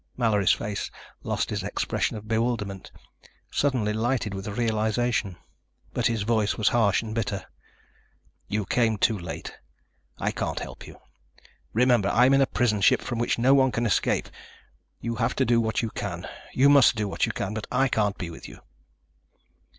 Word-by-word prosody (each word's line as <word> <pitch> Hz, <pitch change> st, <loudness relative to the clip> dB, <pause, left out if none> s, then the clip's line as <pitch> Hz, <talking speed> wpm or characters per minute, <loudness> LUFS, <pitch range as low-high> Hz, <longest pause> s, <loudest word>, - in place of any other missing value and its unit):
Mallory's 105 Hz, -6 st, +3 dB
face 105 Hz, -1 st, -2 dB, 0.3 s
lost -, -, -2 dB
its -, -, -2 dB
expression -, -, -2 dB
of 105 Hz, 0 st, -10 dB
bewilderment, 110 Hz, -4 st, -2 dB, 0.6 s
suddenly 125 Hz, -7 st, +1 dB
lighted 110 Hz, -1 st, -1 dB
with 95 Hz, +2 st, -6 dB
realization. 110 Hz, -2 st, 0 dB, 0.6 s
But 120 Hz, -1 st, +1 dB
his 115 Hz, -3 st, -1 dB
voice 110 Hz, -2 st, +1 dB
was 110 Hz, -4 st, +3 dB
harsh 110 Hz, -4 st, +2 dB
and 110 Hz, -1 st, -6 dB
bitter. 100 Hz, -4 st, -2 dB, 1.0 s
"You 105 Hz, -1 st, -2 dB
came 115 Hz, -1 st, +1 dB
too 110 Hz, +2 st, +2 dB
late. 85 Hz, -4 st, -7 dB, 0.6 s
I -, -, -1 dB
can't -, -, -3 dB
help -, -, -9 dB
you. -, -, -12 dB, 0.7 s
Remember, 120 Hz, -3 st, +3 dB
I'm 125 Hz, +5 st, +4 dB
in 135 Hz, -, +5 dB
a 135 Hz, -, +4 dB
prison 110 Hz, -5 st, +1 dB
ship -, -, +4 dB
from 120 Hz, -2 st, -3 dB
which 120 Hz, -, 0 dB
no 125 Hz, +3 st, +4 dB
one 130 Hz, -1 st, +4 dB
can 115 Hz, +1 st, -1 dB
escape. 105 Hz, -, +1 dB, 0.7 s
You 115 Hz, -1 st, -3 dB
have 115 Hz, +1 st, 0 dB
to 130 Hz, -, +2 dB
do 120 Hz, -1 st, +3 dB
what 110 Hz, +1 st, -1 dB
you 115 Hz, -, -2 dB
can... -, -, -5 dB, 0.2 s
you 135 Hz, +2 st, +4 dB
must 140 Hz, -4 st, +6 dB
do 105 Hz, -2 st, -1 dB
what 95 Hz, -, 0 dB
you -, -, -1 dB
can. 100 Hz, +2 st, -4 dB
But 110 Hz, -1 st, -5 dB
I 135 Hz, -, +3 dB
can't 105 Hz, -4 st, 0 dB
be 85 Hz, -2 st, -5 dB
with -, -, -10 dB
you." -, -, -13 dB
110 Hz, 175 wpm, -26 LUFS, 105-120 Hz, 1.0 s, must